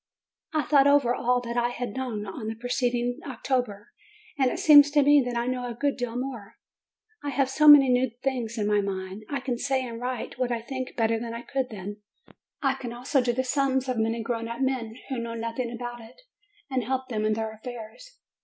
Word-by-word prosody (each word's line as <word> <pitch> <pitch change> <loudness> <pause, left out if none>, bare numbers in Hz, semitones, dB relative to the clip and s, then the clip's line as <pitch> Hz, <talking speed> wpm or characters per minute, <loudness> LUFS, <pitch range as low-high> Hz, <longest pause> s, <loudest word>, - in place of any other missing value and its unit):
I 310 -2 +1
thought 280 -2 +4
over 280 -4 +4
all 250 0 +1
that 235 0 -5
I 240 0 +2
had 245 -2 -4
known 240 -6 -3
on 215 +3 -6
the 220 - -3
preced 245 +1 0
ing 245 0 -1
October, 245 -5 -3 0.4
and 265 -4 +2
it - - -3
seems 290 -2 +8
to 290 0 +4
me 290 0 +6
that 245 -1 -3
I 235 - 0
know 250 0 -2
a 235 - -6
good 280 +3 0
deal 245 -2 -4
more: 245 -5 -5 0.7
I 290 - -2
have 275 -1 0
so 300 +2 +3
many 290 -2 +10
new 250 +1 +3
things 245 -4 -2
in 210 - 0
my 210 0 +2
mind. 190 +1 -5
I 280 - -2
can 250 -2 -3
say 265 0 0
and 230 -1 -7
write 250 0 -4
what 250 -1 0
I 235 - 0
think 255 +2 -6
better 225 -1 +1
than 230 0 -5
I 235 - -6
could 265 -1 -2
then; 205 -1 -7 0.7
I 270 -1 +3
can 250 -3 -6
also 255 +3 +1
do 245 -1 +1
the 260 +2 -1
sums 265 0 0
of 250 -3 -1
many 225 +1 0
grown 230 -1 -3
up 235 +2 -5
men 250 -4 -1
who 260 -3 -2
know 230 0 -4
nothing 230 +1 -3
about 240 0 -6
it, 225 +2 -15 0.5
and 260 -3 -1
help 260 +2 -2
them 215 -3 -2
in 215 0 +2
their 220 0 -2
af 220 - -17
fairs. 250 - -9
245 Hz, 230 wpm, -26 LUFS, 230-265 Hz, 0.7 s, many